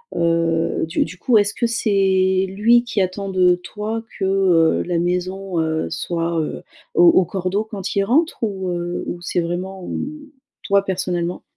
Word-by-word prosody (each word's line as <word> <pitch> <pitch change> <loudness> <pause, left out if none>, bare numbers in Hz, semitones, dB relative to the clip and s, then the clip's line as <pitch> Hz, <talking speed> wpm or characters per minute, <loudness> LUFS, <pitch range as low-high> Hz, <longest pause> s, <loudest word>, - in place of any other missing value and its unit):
heu, 165 -1 +1
du 165 - +1
du 185 - -9
coup, 230 +4 +3
est-ce 205 0 +2
que 235 - 0
c'est 190 -4 +2
lui 230 +5 +3
qui 215 -4 -1
attend 190 +2 -2
de 180 -2 +3
toi 215 +5 -5
que, 195 - -4
heu, 185 -4 +3
la 175 -1 -1
maison, 180 +1 -2
heu, 160 - -1
soit, 165 - -2
heu, 155 - -4 0.3
au 365 -5 +4
au 190 - +5
cordeau 190 +4 -2
quand 200 -4 -5
il 200 - +3
rentre 310 +9 +1
ou, 195 -4 -2
heu, 175 0 -3
ou 175 - -5
c'est 175 0 -1
vraiment, 180 +2 -4
hem, - - -3 0.6
toi 200 0 +3
personnellement? 180 -2 -2
185 Hz, 170 wpm, -20 LUFS, 175-200 Hz, 0.6 s, au